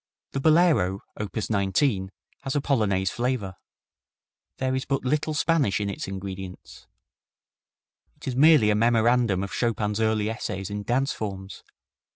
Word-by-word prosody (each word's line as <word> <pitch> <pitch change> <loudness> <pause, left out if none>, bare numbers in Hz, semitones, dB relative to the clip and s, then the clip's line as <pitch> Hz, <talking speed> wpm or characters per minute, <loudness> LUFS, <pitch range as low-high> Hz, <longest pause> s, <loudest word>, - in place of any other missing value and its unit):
The 135 - -2
Bolero, 155 - +3
op. 105 -2 -6
19, 100 0 0 0.3
has 135 - -3
a - - +3
Polonaise 100 -9 +1
flavor. 120 -6 -2 1.0
There 130 0 -1
is 130 0 -1
but 135 -2 -2
little 150 +3 0
Spanish 145 - +2
in 100 -1 -2
its - - -6
ingredients. 95 -1 -8 1.3
It 150 0 -12
is 130 - -2
merely 145 -6 +6
a - - +2
memorandum 115 -2 +2
of 100 - -6
Chopin's 110 -3 -1
early 110 -1 +1
essays 105 -3 -4
in 105 0 -3
dance 130 +6 0
forms. 95 -2 -6
110 Hz, 140 wpm, -25 LUFS, 100-135 Hz, 1.3 s, merely